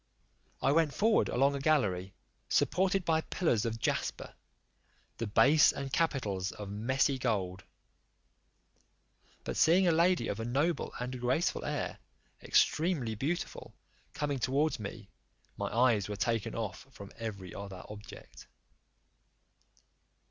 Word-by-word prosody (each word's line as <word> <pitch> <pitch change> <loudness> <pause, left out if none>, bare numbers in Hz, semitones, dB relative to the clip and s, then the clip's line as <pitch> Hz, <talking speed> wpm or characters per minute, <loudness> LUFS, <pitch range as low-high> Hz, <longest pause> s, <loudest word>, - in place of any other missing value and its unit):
I 135 - +4
went 155 -1 +2
forward 220 +1 +3
along 135 +3 +2
a 140 - -3
gallery, 100 -11 +1 0.3
supported 190 0 +2
by 160 -1 +2
pillars 125 - 0
of 115 0 -2
jasper, - - -2 0.9
the 115 - -2
base 145 +8 +5
and 140 -1 -6
capitals 105 - 0
of 100 -1 -8
messy 130 +6 +1
gold: 100 -6 -1 1.8
but - - -4
seeing 180 +3 +4
a - - +5
lady 170 +2 +3
of 100 - -3
a - - -2
noble 145 +8 0
and 125 +1 -4
graceful 130 +7 0
air, - - -3 0.4
extremely 150 -8 +2
beautiful, 145 +11 -4 0.4
coming 145 -2 -1
towards 140 +3 +1
me, 105 0 -8 0.4
my - - -3
eyes 115 -4 +2
were 105 - -3
taken 115 0 -1
off 110 +2 -5
from 100 -6 -11
every 100 -5 -6
other 100 -2 -8
objets. 105 0 -11
125 Hz, 125 wpm, -31 LUFS, 105-155 Hz, 1.8 s, base